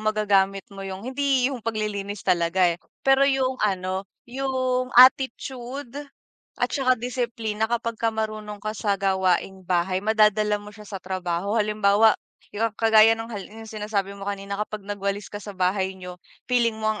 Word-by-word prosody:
magagamit 200 -2 +1
mo 195 - -9
yung 195 +2 -6
hindi 265 -1 +1
yung 250 - -5
paglilinis 210 -2 -3
talaga 180 0 +2
eh, 170 - -9 0.2
pero 270 0 +5
yung 260 -1 0
ano, 190 -1 -1 0.2
yung 255 0 -1
attitude 260 0 +3 0.6
at - - 0
saka 255 -3 +2
disiplina 230 -3 -2
kapagka 230 -1 -1
marunong 215 -1 -4
ka 215 +1 -4
sa 200 0 0
gawaing 190 -1 +1
bahay 180 +1 0
madadala 210 0 +3
mo 205 0 -11
siya 210 -1 -12
sa 195 - -5
trabaho, 185 +1 -3
halimbawa, 210 0 +4 0.4
yung 225 +2 0
kagaya 225 0 +6
nung 225 +1 -7
hal 200 -2 -6
yung 225 +1 -11
sinasabi 210 -2 -2
mo 200 0 -9
kanina 200 0 -4
kapag 215 -1 -4
nagwalis 200 0 -3
ka 205 - -4
sa 205 -1 -9
bahay 190 +1 0
niyo 180 -1 -9 0.3
feeling 235 -2 +3
mo 215 0 0
ang 210 - -7
210 Hz, 160 wpm, -24 LUFS, 195-230 Hz, 0.6 s, kagaya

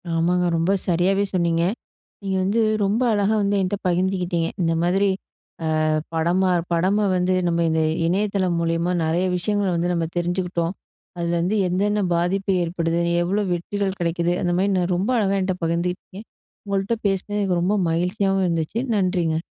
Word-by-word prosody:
ஆமாங்க, 175 +2 +2
ரொம்ப 165 +3 +1 0.2
சரியாவே 185 +3 +2
சொன்னீங்க. 170 -2 +1 0.6
நீங்க 190 -1 -1
வந்து, 205 +5 +1 0.2
ரொம்ப 205 +5 +1
அழகா 205 +1 +2
வந்து 200 0 +1
என்ட்ட 185 +2 -1
பகிர்ந்துகிட்டீங்க. 180 -2 0
இந்த 165 -1 +2
மாதிரி, 190 +3 +2 0.7
ஆ - - +1 0.3
படமா 175 +4 +1 0.2
படம 195 +5 +2
வந்து 180 +1 +1
நம்ம 170 0 +1
இந்த 160 0 +1 0.2
இணையதளம் 190 -1 0
மூலியமா 165 +1 0
நெறைய 165 +3 +1
விஷயங்கள 205 +2 0
வந்து 175 +1 0
நம்ம 165 -1 -1
தெரிஞ்சுக்கிட்டோம். 175 -1 -1 0.4
அதுல 170 0 -1
வந்து 185 +5 0
என்னென்ன 205 +4 0
பாதிப்பு 190 +3 0
ஏற்படுது? 170 0 -1 0.2
எவ்வளோ 195 +4 0
வெற்றிகள் 195 +2 -2
கெடைக்குது? 170 0 0
அந்த 175 -2 0
மாரி 195 +2 +2
நான் 180 0 0
ரொம்ப 190 +6 -1
அழகா 200 -3 +1
என்ட்ட 185 0 -1
பகிர்ந்துகிட்டீங்க. 180 +4 -3 0.4
உங்கள்ட்ட 200 +2 -1
பேசனது 195 +1 -2
எனக்கு 185 -3 +1
ரொம்ப 190 +4 +1 0.2
மகிழ்ச்சியாவும் 190 +3 0
இருந்துச்சு. 170 +6 -1 0.2
நன்றிங்க. 175 -4 0
180 Hz, 145 wpm, -22 LUFS, 170-195 Hz, 0.7 s, ஆமாங்க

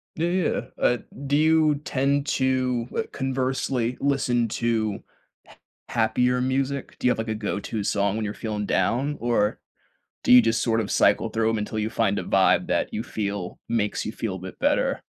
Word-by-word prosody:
Yeah, 165 +2 0
yeah, 180 -1 0 0.2
uh, 125 - +3 0.3
do 140 - +2
you 155 -1 +4
tend 140 +1 +1
to, 130 -2 +1
uh, - - +1
conversely 130 -2 -1
listen 130 -4 +1
to 110 -3 -1 0.4
ha - - -17 0.3
happier 125 +2 +1
music? 135 +1 -2
Do - - +1
you - - +5
have, - - 0
like, 110 - -3
a 110 - -1
go 105 -1 -3
to 105 0 -4
song 100 0 0
when 110 -1 -2
you're 105 - -3
feeling 105 -2 -4
down, 140 +8 0
or 115 -3 +1 0.6
do - - +3
you 125 - +10
just 115 0 +1
sort 115 -1 +1
of 105 - -3
cycle 105 +3 +3
through 110 0 +1
'em 115 - 0
until 105 +1 -3
you 110 +1 -1
find - - +1
a - - -3
vibe - - +3
that - - 0
you 110 - -2
feel 100 -5 -4
makes 105 -3 -1
you 110 - -3
feel 110 -5 -4
a - - -7
bit 95 0 -9
better? - - +1
115 Hz, 195 wpm, -25 LUFS, 110-130 Hz, 0.6 s, you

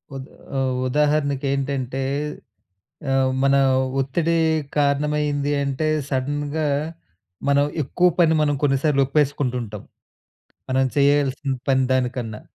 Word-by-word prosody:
ఉదా 135 -1 -6 0.3
ఆహ్, 130 -1 0
ఉదాహరణకు 145 0 +1
ఏంటంటే 135 -1 -2 1.1
ఆహ్, 135 -1 +2
మన 140 0 +4 0.4
ఒత్తిడి 165 +5 0 0.4
కారణమైంది 145 0 +1
అంటే 140 +3 -1 0.2
సడెన్‌గా 145 +3 -2 0.8
మనం 140 0 +4 0.2
ఎక్కువ 180 +6 +2
పని 165 -2 +5
మనం 145 -1 +1
కొన్నిసార్లు 140 0 +2
ఒప్పేసుకుంటూ 140 -2 0
ఉంటాం. 105 -3 -8 0.9
మనం 130 +1 +2
చేయాల్సిన 140 0 +2 0.2
పని 130 0 +3
దానికన్నా. 125 -4 -2
140 Hz, 100 wpm, -22 LUFS, 130-145 Hz, 1.1 s, పని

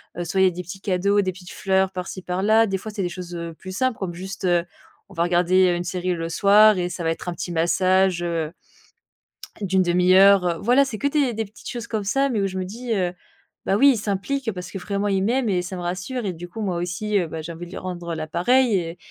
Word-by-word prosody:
heu, 175 - -3
soit 190 +3 0
il - - +6
y - - +6
a 185 - +2
des 180 - -6
petits 180 +2 -9
cadeaux, 200 +2 +2
des 185 - -1
petites 180 0 -13
fleurs, 190 -1 +1
par-ci 185 0 -6
par-là. 210 +5 +2
Des 195 -1 -1
fois, 215 +3 -8
c'est 205 - -3
des 180 - -1
choses, 180 0 -8
heu, 170 -1 -6
plus 185 +2 -9
simples, 255 +2 0
comme 185 -3 -4
juste, 190 +2 -6
heu, 175 -1 +3 0.5
on 195 - -14
va 165 - +1
regarder, 180 +1 +3
heu, - - 0
une 175 - -3
série 180 0 -2
le 165 -1 -4
soir 205 +4 +5
et 180 -1 -1
ça 175 -1 -5
va 165 - +1
être 165 +2 -3
un - - -3
petit 175 - -5
massage, 185 +2 +2
heu 165 -2 -2 1.1
d'une 190 -1 +2
1/2 180 +1 +3
heure, 195 -1 +7
heu, 170 -1 0
voilà, 250 +5 +4
c'est 260 -5 -4
que 280 - 0
des 280 -4 +1
des 225 0 -2
petites 210 +2 -11
choses 235 -2 -5
comme 220 -3 -2
ça, 270 +8 +1
mais 220 -5 0
où 195 - +1
je 190 - -5
me 185 - -2
dis, 230 +4 -4
heu, 180 -3 0 0.5
bah 195 - +2
oui, 280 +5 +7
il - - -3
s'implique 220 +5 -2
parce 180 -2 -7
que - - -6
vraiment 200 +2 -2
il 195 -1 +1
m'aime 240 +3 +1
et 180 -2 +1
ça 180 +1 -6
me - - -5
rassure 185 +8 -3
et 190 - -2
du 175 +1 -9
coup, 225 - -9
moi 190 -4 -1
aussi, 185 +5 -1
heu, 175 - -1
bah 160 0 -6
j'ai 165 +2 -7
envie 170 +2 -8
de 175 - -13
lui - - -7
rendre, 175 -2 -5
heu, - - -2
la 155 -1 -4
pareille 245 +10 +2
et 170 -2 -2
185 Hz, 275 wpm, -23 LUFS, 175-205 Hz, 1.1 s, heure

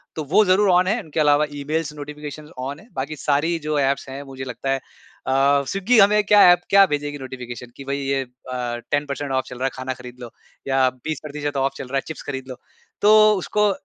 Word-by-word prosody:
तो 155 - -3
वो 215 - +7
ज़रूर 195 +2 +4
ऑन 180 +1 +4
है। 220 +5 +1
उनके 160 -1 -4
अलावा 150 0 +4
ईमेल्स 150 +2 -3
नोटिफिकेशन्स 150 +1 -8
ऑन 135 +3 -5
है। 215 - -17
बाकी 135 +4 -4
सारी 150 +4 0
जो 150 -1 -2
ऐप्स 140 0 0
हैं 135 +1 -6
मुझे 135 -1 -8
लगता 125 +1 -5
है 135 - +2 0.5
अ, - - 0 0.4
स्विग्गी 200 +5 +1
हमें 210 +1 +5
क्या 205 0 +5
ऐप 175 0 +3
क्या 200 0 +7
भेजेगी 145 -3 -3
नोटिफिकेशन 125 -3 -8
कि 140 - -9
भई 140 +1 -2
ये 135 0 -1
अ, - - -13 0.7
10 145 0 +1
पर्सेंट 140 0 -4
ऑफ़ 130 -1 0
चल 125 - -8
रहा 130 - -2
है 135 - 0
खाना 130 0 -4
खरीद 125 0 -12
लो। 120 -2 -8 0.4
या 135 -1 +3
20% 150 -2 -4
ऑफ़ 135 0 0
चल - - -7
रहा 135 +2 -2
है - - +1
चिप्स 160 - -7
खरीद 135 -2 -5
लो। 130 - -6 0.5
तो 210 - +5 0.3
उसको 210 +2 +1
145 Hz, 220 wpm, -22 LUFS, 135-160 Hz, 0.7 s, वो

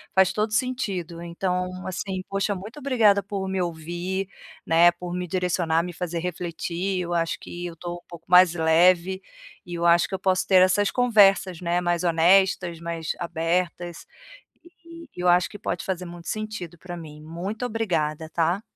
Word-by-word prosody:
Faz 190 -1 +5
todo 215 +1 -1
sentido 205 -9 -2
então, 180 +1 -3
assim, 190 0 -4
poxa 195 +1 0
muito 210 +8 -9
obrigada 225 -7 +3
por 195 -1 -4
me 190 -1 -1
ouvir, 175 +3 -3 0.4
né, 165 +1 +6
por 175 0 -7
me 180 0 -3
direcionar, 170 -2 0
me 175 -1 -6
fazer 170 0 -3
refletir. 180 +2 -3
Eu 175 0 -3
acho 165 -1 0
que 175 0 -7
eu 170 - -8
tô 175 +1 -6
um 175 - -17
pouco 170 -1 -11
mais 180 -1 +7
leve, 175 +3 +3 0.4
e 175 -2 -7
eu 170 0 -2
acho 170 0 +5
que - - -11
eu - - -5
posso 185 0 +1
ter 185 -2 +6
essas 195 +2 +3
conversas, 195 -7 +4
né, 175 +1 0
mais 175 0 0
honestas, 175 0 +3
mais 170 -1 -4
abertas, 170 +1 -2 0.6
e 335 -1 -14
e 180 - -6
eu 180 - +1
acho 175 0 +4
que 205 - -10
pode 175 - -3
fazer 185 -1 -3
muito 170 -1 -10
sentido 215 -6 -5
pra 175 +1 -8
mim. 150 -2 -10
Muito 180 +9 -5
obrigada, 165 -9 -1
tá. 170 +5 0
180 Hz, 175 wpm, -25 LUFS, 170-195 Hz, 0.6 s, mais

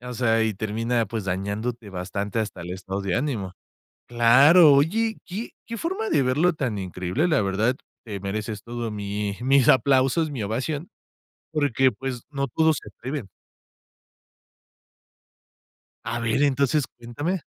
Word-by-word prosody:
o 125 0 -7
sea, 115 -2 +2
y 110 -1 -1
termina, 115 +3 -1
pues, 110 -1 -4
dañándote 100 +4 -3
bastante 100 +3 -3
hasta 105 -4 -3
el 85 +1 -7
estado 95 +1 -4
de 95 -3 -1
ánimo. 115 -9 -2 0.6
Claro, 135 +8 +7
oye, 210 +11 +2
qué 205 +6 -5 0.2
qué 230 - -5
forma 380 - -2
de - - +3
verlo 150 +8 +2
tan 130 -9 -2
increíble, 95 - -1
la 155 -7 +3
verdad 105 +5 +1 0.3
te 100 -4 -6
mereces 105 +1 -4
todo 120 -1 -4
mi 100 0 -3
mis 135 0 +4
aplausos, 135 +4 +3
mi 130 -5 -4
ovación, 130 - -3 0.6
porque, 135 -4 +2
pues, 125 +2 -5
no 140 -1 -1
todo 160 +5 +3
se 150 - -6
atreven. 130 -5 -6 2.8
A 115 +1 -3
ver, 115 +4 +1
entonces 140 0 +2
cuéntame. 145 +10 -4
120 Hz, 140 wpm, -24 LUFS, 105-145 Hz, 2.8 s, Claro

